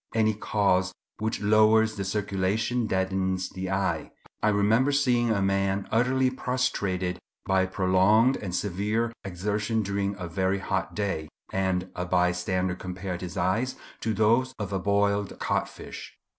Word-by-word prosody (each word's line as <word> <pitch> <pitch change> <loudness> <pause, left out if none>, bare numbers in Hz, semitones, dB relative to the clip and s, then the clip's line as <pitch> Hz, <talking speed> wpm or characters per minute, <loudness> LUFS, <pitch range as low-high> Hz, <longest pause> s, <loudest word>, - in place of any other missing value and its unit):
Any 110 -1 +3
cause 100 -3 +1 0.3
which 110 0 -2
lowers 110 +1 +4
the 100 - -3
circulation 105 +4 -1
deadens 95 -1 0
the 95 0 -5
eye. 95 0 -1 0.3
I 110 - +3
remember 110 +6 +3
seeing 125 -4 +2
a 100 -3 +1
man 95 0 0
utterly 130 +3 +2
prostrated 100 -9 -1 0.3
by 95 -1 +2
prolonged 95 +6 +3
and 90 -4 -4
severe 105 +5 -1
exertion 105 +4 -1
during 100 0 -1
a 90 -3 -5
very 95 +3 0
hot 95 -1 -2
day, 95 -7 -2 0.2
and 95 -1 0
a 90 - -2
bystander 90 +1 +1
compared 90 0 -5
his 90 -2 -6
eyes 110 +9 0 0.2
to 110 -1 -1
those 115 +5 +2
of 100 -2 -4
a 95 - 0
boiled 100 +1 +1
codfish. - - -4
100 Hz, 140 wpm, -27 LUFS, 95-110 Hz, 0.3 s, lowers